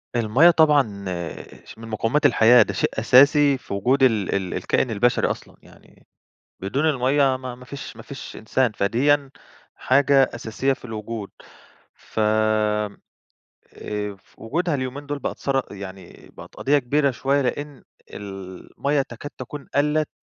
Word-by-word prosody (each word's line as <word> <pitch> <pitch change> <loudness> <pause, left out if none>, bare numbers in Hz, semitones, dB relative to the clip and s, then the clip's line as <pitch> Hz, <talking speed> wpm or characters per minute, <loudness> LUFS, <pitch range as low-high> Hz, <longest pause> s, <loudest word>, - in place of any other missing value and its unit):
الميَّة 120 +9 +5
طبعًا 140 - +2 0.6
ش - - -13
من 115 0 -10
مقومات 115 +7 0
الحياة، 120 -3 +6
ده - - -5
شيء - - 0
أساسي 140 +2 +5
في 125 - -9
وجود 130 +7 +1
ال 110 -8 +2
ال 95 -2 -2
الكائن 125 - 0
البشري 120 +3 +2
أصلًا، - - -8
يعني - - -21 0.5
بدون 135 +11 0
المَيَّة 135 -1 +2
ما 130 -1 -7
ما 125 - -14
فيش 140 +2 -9
ما - - -10
فيش - - -9
إنسان، 120 +2 0
فديًا 135 +8 +1 0.4
حاجة 135 0 +3
أساسية 115 +4 -1
في 130 - -9
الوجود 110 -2 -6 0.6
ف - - -11
آآ 105 -1 0 1.3
وجودها 165 +8 -1
اليومين 135 +1 -4
دول 145 0 -3
بقت - - -5
ثر 135 -1 0
يعني 95 -2 -11
بقت - - -13
قضية 145 +2 +2
كبيرة 140 +2 +1
شوية، 135 +3 0
لإن 145 +1 -4 0.3
المَيَّة 100 +8 -4
تكاد 135 +4 -9
تكون 145 -2 -8
قَلّت 150 +2 +1
130 Hz, 140 wpm, -23 LUFS, 110-145 Hz, 1.3 s, الحياة